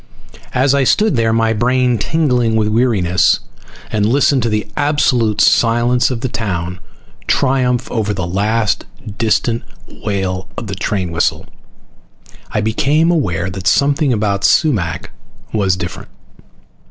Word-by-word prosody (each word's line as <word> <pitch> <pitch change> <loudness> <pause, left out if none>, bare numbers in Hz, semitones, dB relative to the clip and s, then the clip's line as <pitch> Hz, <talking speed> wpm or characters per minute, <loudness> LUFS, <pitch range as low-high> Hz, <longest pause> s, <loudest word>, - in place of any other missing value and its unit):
As 130 +2 +3
I 140 -1 +2
stood 210 - +2
there, 115 -1 +1
my 115 0 +2
brain 125 +1 +1
tingling 125 -6 +1
with 110 -1 +1
weariness, 105 -6 +2 0.5
and 105 -2 0
listened 135 +4 +2
to 115 - 0
the 105 0 -1
absolute 125 -7 +1
silence 120 +1 +3
of 125 -3 -4
the 130 - -1
town 90 -6 -4 0.5
triumph 130 -3 +1
over 110 -3 -1
the 95 -3 -3
last 105 +2 0 0.3
distant 115 +1 +1 0.3
wail 95 -3 -4
of - - -5
the 100 - -5
train 95 -3 -2
whistle, 85 0 -1 1.0
I 105 - -1
became 145 +10 +1
aware 95 - -1
that 95 0 -5
something 140 0 +2
about 100 -3 -1
Sumac 105 - +1 0.4
was 100 -4 +1
different. 90 -2 -7
115 Hz, 130 wpm, -16 LUFS, 100-125 Hz, 1.0 s, As